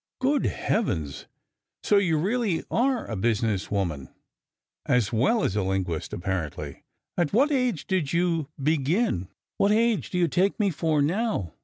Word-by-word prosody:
"Good 275 +2 +2
heavens! 80 - -2 0.6
So 205 - +4
you 175 -6 +2
really 200 0 0
are 250 0 +1
a 110 - -5
business 110 -1 0
woman, 85 -9 -2 0.8
as 125 -3 +2
well 140 - +2
as 100 - 0
a 105 - +1
linguist, 95 -4 -2
apparently. 90 -4 -4 0.4
At 170 -2 +1
what 275 +8 +4
age 250 - 0
did 180 -7 -1
you 170 -4 0
begin?" 150 - +1 0.3
"What 200 - +3
age 225 0 +2
do 180 - -3
you 175 -1 +3
take 185 +7 +1
me 200 -2 +2
for 155 -2 +1
now? 175 - -1
160 Hz, 150 wpm, -26 LUFS, -, 0.8 s, So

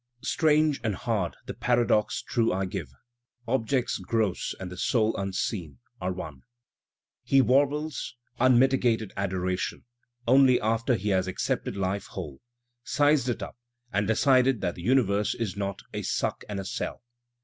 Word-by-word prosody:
Strange 155 -2 +2
an^ 110 -3 -1
hard 105 -5 -2
the - - -5
paradox 120 -3 +1
true 115 -1 +1
I 95 +1 0
give, 80 -7 -5 0.6
Objects 125 +1 0
gross 110 -5 -1
and 90 -1 -6
the 90 - -8
soul 110 +3 +1
unseen 95 - -3 0.2
are 90 - -1
one. 80 -7 -7 0.8
He 135 - +3
warbles 140 +1 +1 0.2
"unmitigated 125 -4 +3
adoration" 95 -2 -2 0.4
only 130 0 +6
after 115 +3 +1
he 105 -1 -2
has 95 -1 +2
accepted 95 +1 -2
life 100 +1 -2
whole, 75 -8 -7 0.4
"sized 145 -3 +2
it 120 - -2
up" - - -9 0.3
and 100 0 +1
decided 130 +1 +3
that 90 -2 -1
the 85 - -10
uni 130 +7 +4
verse 100 0 0
is 110 -6 -3
not 100 -1 -4
"a - - -3
suck - - -2
and 100 -1 -3
a 95 - -5
sell." 105 - -4
110 Hz, 150 wpm, -27 LUFS, 95-130 Hz, 0.8 s, only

